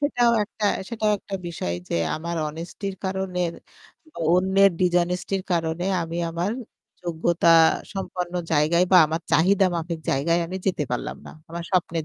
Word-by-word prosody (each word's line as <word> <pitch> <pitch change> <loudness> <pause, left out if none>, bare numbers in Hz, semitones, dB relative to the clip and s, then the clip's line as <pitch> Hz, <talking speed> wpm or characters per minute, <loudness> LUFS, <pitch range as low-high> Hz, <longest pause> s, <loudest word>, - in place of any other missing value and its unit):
সেটাও 245 -5 +3
একটা, 210 0 -6 0.2
সেটাও 220 -3 0
একটা 195 - -8
বিষয় 120 - -3
যে - - -2 0.2
আমার 170 +2 -4
honesty 165 +6 -7
র - - -10
কারনের 185 -2 -1 0.6
ব - - -60 0.2
অন্যের 190 +2 +4
dishonesty 180 +1 +1
র - - -11
কারণে 165 +1 -1 0.2
আমি 165 +1 -5
আমার 170 +4 -1 0.5
যোগ্যতা 170 0 +1 0.4
সম্পন্ন 180 -2 -4 0.2
জায়গায় 160 +4 +3
বা - - +9
আমার 160 +2 -2
চাহিদা 190 +4 +4
মাফিক 170 0 -3
জায়গায় 165 +5 +2
আমি 185 +2 -5
যেতে 180 -6 +1
পারলাম 135 +4 -3
না। - - -8 0.2
আমার 170 +1 -5
স্বপ্নের 170 -3 0
175 Hz, 155 wpm, -24 LUFS, 165-190 Hz, 0.6 s, বা